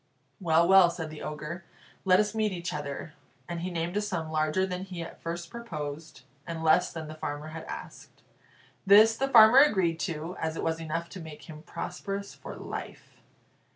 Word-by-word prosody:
"Well, 170 Hz, -2 st, +3 dB
well," 190 Hz, -2 st, +7 dB
said 165 Hz, -2 st, -5 dB
the 155 Hz, -, -9 dB
Ogre, 155 Hz, +4 st, -6 dB, 0.4 s
"let 185 Hz, 0 st, +5 dB
us 210 Hz, 0 st, +1 dB
meet 215 Hz, -1 st, +1 dB
each 175 Hz, -1 st, -4 dB
other." 145 Hz, +1 st, -5 dB, 0.3 s
And 170 Hz, -1 st, -4 dB
he 180 Hz, -, -3 dB
named 170 Hz, +1 st, -3 dB
a 210 Hz, -, +2 dB
sum 160 Hz, -6 st, -3 dB
larger 155 Hz, +4 st, +1 dB
than 180 Hz, -1 st, -4 dB
he 180 Hz, -3 st, -6 dB
at 165 Hz, -, -11 dB
first 170 Hz, 0 st, -5 dB
proposed, 155 Hz, -, -7 dB, 0.2 s
and 165 Hz, -1 st, -4 dB
less 160 Hz, +3 st, +4 dB
than 160 Hz, -2 st, -6 dB
the 155 Hz, -, -7 dB
farmer 150 Hz, 0 st, -5 dB
had 160 Hz, +1 st, -8 dB
asked. -, -, -10 dB, 0.6 s
This 215 Hz, +3 st, +7 dB
the 270 Hz, -, 0 dB
farmer 235 Hz, 0 st, +8 dB
agreed 190 Hz, -, +4 dB
to, 165 Hz, 0 st, -4 dB
as 160 Hz, 0 st, -2 dB
it -, -, -4 dB
was 165 Hz, 0 st, -1 dB
enough 165 Hz, +1 st, -3 dB
to 190 Hz, -, -9 dB
make 160 Hz, -3 st, -10 dB
him 155 Hz, -2 st, -10 dB
prosperous 195 Hz, +4 st, -5 dB
for -, -, -9 dB
life. -, -, -8 dB
170 Hz, 190 wpm, -28 LUFS, 160-190 Hz, 0.6 s, farmer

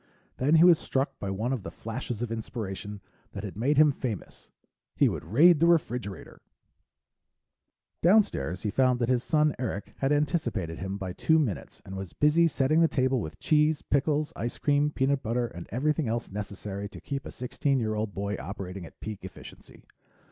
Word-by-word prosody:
Then 145 Hz, +5 st, +3 dB
he 165 Hz, -, +7 dB
was 175 Hz, -3 st, +7 dB
struck 135 Hz, +1 st, -2 dB
by 100 Hz, -, -4 dB
one 110 Hz, +7 st, -1 dB
of 130 Hz, -, -2 dB
the -, -, -6 dB
flashes 115 Hz, 0 st, -5 dB
of 120 Hz, -, -4 dB
inspiration 105 Hz, -3 st, -5 dB, 0.3 s
that 100 Hz, -, -6 dB
had 100 Hz, -, -6 dB
made 135 Hz, +7 st, +1 dB
him 150 Hz, 0 st, +7 dB
famous 125 Hz, -7 st, -6 dB, 0.5 s
he -, -, +4 dB
would -, -, -3 dB
raid 150 Hz, -, +5 dB
the 170 Hz, -, +4 dB
refrigerator. 125 Hz, -, -1 dB, 1.6 s
Downstairs, 160 Hz, -, +3 dB
he 105 Hz, -, -1 dB
found 130 Hz, 0 st, +3 dB
that 120 Hz, -1 st, -1 dB
his 125 Hz, -1 st, +2 dB
son 150 Hz, -1 st, +2 dB
Eric 110 Hz, -5 st, -4 dB
had 135 Hz, +1 st, +1 dB
anticipated 145 Hz, -, 0 dB
him 95 Hz, +1 st, -4 dB
by 95 Hz, -2 st, -5 dB
two 160 Hz, -, +3 dB
minutes, 130 Hz, -, -2 dB
and 95 Hz, -, -7 dB
was 95 Hz, -3 st, -6 dB
busy 155 Hz, +3 st, +4 dB
setting 155 Hz, +1 st, +2 dB
the 165 Hz, -, +6 dB
table 130 Hz, -4 st, +1 dB
with 80 Hz, -5 st, -7 dB
cheese, 150 Hz, 0 st, +2 dB
pickles, 150 Hz, +2 st, 0 dB
ice 120 Hz, +1 st, -4 dB
cream, 145 Hz, 0 st, +2 dB
peanut 135 Hz, -1 st, 0 dB
butter, 120 Hz, +2 st, 0 dB
and 85 Hz, -7 st, -8 dB
everything 150 Hz, +5 st, 0 dB
else 115 Hz, -1 st, -2 dB
necessary 100 Hz, 0 st, -5 dB
to -, -, -11 dB
keep 140 Hz, -1 st, -5 dB
a -, -, -7 dB
sixteen 135 Hz, +2 st, -1 dB
year 110 Hz, -2 st, -1 dB
old 105 Hz, 0 st, -2 dB
boy 100 Hz, +1 st, -2 dB
operating 95 Hz, -2 st, -6 dB
at -, -, -19 dB
peak 105 Hz, -2 st, -5 dB
efficiency. 95 Hz, -, -12 dB
125 Hz, 185 wpm, -28 LUFS, 100-150 Hz, 1.6 s, he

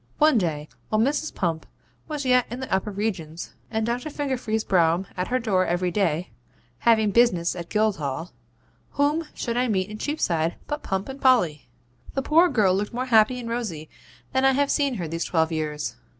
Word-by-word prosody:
One 305 Hz, -5 st, +5 dB
day, 155 Hz, -5 st, -2 dB, 0.2 s
while 215 Hz, -, +1 dB
Mrs. 290 Hz, +6 st, +1 dB
Pump 165 Hz, -3 st, -2 dB, 0.4 s
was 300 Hz, -3 st, -4 dB
yet 250 Hz, -1 st, +4 dB
in 245 Hz, -, -5 dB
the 260 Hz, -, -4 dB
upper 190 Hz, +2 st, 0 dB
regions, 185 Hz, -6 st, -4 dB, 0.2 s
and 220 Hz, -1 st, -1 dB
Doctor 245 Hz, +6 st, -2 dB
Fingerfee's 255 Hz, -7 st, -2 dB
brougham 170 Hz, 0 st, +2 dB
at 180 Hz, 0 st, -2 dB
her 255 Hz, -, +1 dB
door 205 Hz, -7 st, +1 dB
every 175 Hz, +1 st, 0 dB
day, 180 Hz, -3 st, 0 dB, 0.5 s
having 220 Hz, -3 st, +3 dB
business 185 Hz, -8 st, +3 dB
at 170 Hz, -1 st, -7 dB
Guildhall, 175 Hz, -7 st, -1 dB, 0.6 s
whom 300 Hz, +3 st, +1 dB
should 235 Hz, -1 st, -3 dB
I 250 Hz, +1 st, +2 dB
meet 195 Hz, -2 st, 0 dB
in 215 Hz, -, -7 dB
Cheapside 170 Hz, -, 0 dB
but 295 Hz, 0 st, -4 dB
Pump 190 Hz, 0 st, -2 dB
and 270 Hz, +1 st, -8 dB
Polly? 180 Hz, -, +3 dB, 0.5 s
The 270 Hz, -, 0 dB
poor 330 Hz, +5 st, +5 dB
girl 200 Hz, -, +3 dB
looked 205 Hz, +4 st, -2 dB
more 255 Hz, +1 st, -1 dB
happy 235 Hz, 0 st, +4 dB
and 235 Hz, -, -6 dB
rosy 215 Hz, -10 st, -4 dB, 0.4 s
than 260 Hz, 0 st, +2 dB
I 270 Hz, 0 st, +5 dB
have 280 Hz, +1 st, +1 dB
seen 280 Hz, -4 st, +1 dB
her 175 Hz, -6 st, -3 dB
these 165 Hz, +2 st, -3 dB
twelve 160 Hz, -1 st, +1 dB
years. 150 Hz, -6 st, -3 dB
215 Hz, 185 wpm, -24 LUFS, 175-255 Hz, 0.6 s, One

